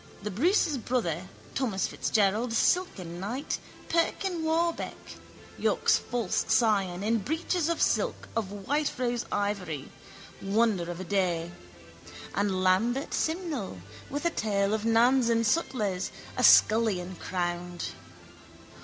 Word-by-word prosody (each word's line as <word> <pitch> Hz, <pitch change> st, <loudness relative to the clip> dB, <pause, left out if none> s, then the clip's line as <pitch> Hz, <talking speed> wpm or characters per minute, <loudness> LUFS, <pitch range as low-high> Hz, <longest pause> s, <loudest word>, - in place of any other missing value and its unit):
The 210 Hz, -, -3 dB
Bruce's 310 Hz, -, +2 dB
brother, 190 Hz, -8 st, -1 dB, 0.3 s
Thomas 225 Hz, -8 st, 0 dB
Fitzgerald, 220 Hz, +3 st, +1 dB
silken 190 Hz, -, 0 dB
knight, 235 Hz, +9 st, -3 dB, 0.3 s
Perkin 340 Hz, +1 st, 0 dB
Warbeck, 330 Hz, +1 st, 0 dB, 0.6 s
York's -, -, +3 dB
false 235 Hz, -6 st, -1 dB
scion, 200 Hz, -6 st, +2 dB
in 225 Hz, +2 st, +2 dB
breeches 325 Hz, -, -1 dB
of 335 Hz, -, 0 dB
silk -, -, +1 dB
of 225 Hz, -3 st, 0 dB
whiterose 245 Hz, +2 st, -1 dB
ivory, 190 Hz, -9 st, -2 dB, 0.5 s
wonder 200 Hz, -3 st, +1 dB
of 175 Hz, 0 st, -5 dB
a -, -, -4 dB
day, 175 Hz, -3 st, 0 dB, 0.8 s
and 195 Hz, -2 st, 0 dB
Lambert 230 Hz, +9 st, +2 dB
Simnel, 320 Hz, -, -2 dB, 0.3 s
with 290 Hz, +4 st, -4 dB
a 340 Hz, -, +3 dB
tail 200 Hz, -5 st, 0 dB
of 220 Hz, 0 st, -1 dB
nans 235 Hz, +2 st, +4 dB
and 230 Hz, 0 st, +2 dB
sutlers, 210 Hz, -, 0 dB, 0.3 s
a -, -, -1 dB
scullion 195 Hz, -5 st, +5 dB
crowned. 175 Hz, -1 st, -3 dB
220 Hz, 115 wpm, -28 LUFS, 185-265 Hz, 0.8 s, scullion